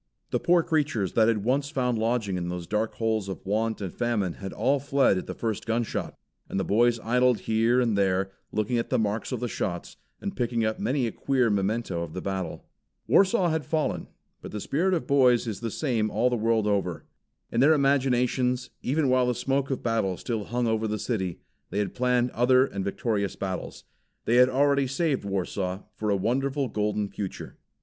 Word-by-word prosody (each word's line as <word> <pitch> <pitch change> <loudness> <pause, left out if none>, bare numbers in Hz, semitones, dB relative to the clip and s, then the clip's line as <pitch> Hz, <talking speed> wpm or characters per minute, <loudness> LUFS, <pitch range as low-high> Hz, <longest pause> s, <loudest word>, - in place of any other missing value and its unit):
The - - +1
poor 175 -1 +3
creatures 145 - 0
that 110 -1 +4
had 110 -3 +1
once 135 +4 +1
found 125 -5 0
lodging 110 -4 0
in 90 -1 -3
those 90 -1 -4
dark 105 +4 -1
holes 110 -3 -1
of 95 - -7
want 110 +2 -1
and 95 -3 -4
famine 110 -7 0
had 95 +2 -7
all 140 +1 +1
fled 140 -5 +3
at - - -8
the - - -5
first 110 -2 -3
gunshot; 115 0 -2 0.3
and - - -2
the - - +1
boys 120 +4 +3
idled 125 +1 +2
here 115 +3 +2
and 115 -4 +2
there, 95 -1 +1 0.2
looking 110 +3 0
at 115 - -3
the - - +2
marks 110 0 -1
of - - -3
the 125 - -1
shots, 90 -6 -4 0.2
and 200 -1 -5
picking 120 -2 0
up 110 0 -1
many 130 0 0
a 115 - -2
queer 130 -3 +1
memento 100 -2 -1
of 85 -2 -6
the - - -2
battle. 95 -2 -4 0.4
Warsaw 190 -2 +4
had 160 -1 -1
fallen; 155 0 -1 0.3
but - - -8
the 105 - -4
spirit 180 - +1
of 165 - -2
boys 125 -4 +4
is 110 -4 -4
the 115 - -3
same 115 -4 0
all 125 +4 +1
the - - +2
world 115 -1 +1
over. 95 -5 -1 0.5
In 115 - 0
their 145 +5 +6
imaginations, 130 -2 +1
even 145 +2 +1
while 130 -1 +3
the 125 - +1
smoke 135 +2 0
of 135 - -3
battle 110 -6 0
still 110 -4 -3
hung 120 +1 -1
over 110 -1 0
the 105 0 -2
city, 95 -6 -3 0.3
they 100 - -4
had 105 -1 -1
planned 125 0 +1
other 130 +2 +4
and 100 -7 -4
victorious 100 0 -1
battles. 95 -1 -5 0.4
They 120 - +3
had 125 +1 +7
already 140 +1 +2
saved 135 -2 0
Warsaw 95 -1 -2
for 105 - -3
a 100 - +3
wonderful 135 +6 0
golden 105 -1 -1
future. 100 -1 -7
115 Hz, 200 wpm, -26 LUFS, 105-130 Hz, 0.5 s, had